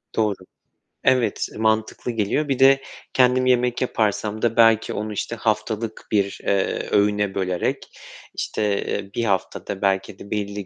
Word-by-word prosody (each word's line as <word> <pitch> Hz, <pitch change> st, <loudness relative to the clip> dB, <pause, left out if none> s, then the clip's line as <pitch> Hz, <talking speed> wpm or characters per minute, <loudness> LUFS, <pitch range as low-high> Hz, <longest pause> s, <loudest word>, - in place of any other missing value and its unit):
Doğru. 105 Hz, -3 st, +1 dB, 0.7 s
Evet, 125 Hz, -5 st, +2 dB
mantıklı 110 Hz, +2 st, 0 dB
geliyor. 115 Hz, +7 st, 0 dB
Bir 135 Hz, -2 st, -1 dB
de 135 Hz, 0 st, +6 dB, 0.3 s
kendim 130 Hz, 0 st, +4 dB
yemek 125 Hz, -1 st, +2 dB
yaparsam 110 Hz, -3 st, -1 dB
da 115 Hz, -1 st, +1 dB
belki 115 Hz, -1 st, +4 dB
onu, 105 Hz, 0 st, -4 dB
işte, 115 Hz, +3 st, -3 dB
haftalık 110 Hz, 0 st, -2 dB
bir, 100 Hz, -2 st, 0 dB
eee, 100 Hz, -1 st, 0 dB
öğüne 105 Hz, -1 st, +2 dB
bölerek, 90 Hz, -2 st, -1 dB, 0.6 s
işte, 105 Hz, -2 st, -1 dB
eee, 100 Hz, -1 st, -4 dB
1 115 Hz, -, 0 dB
haftada 95 Hz, -1 st, -2 dB
belki 95 Hz, -1 st, 0 dB
de 100 Hz, -, -11 dB
belli 100 Hz, -1 st, -3 dB
110 Hz, 140 wpm, -22 LUFS, 100-120 Hz, 0.7 s, de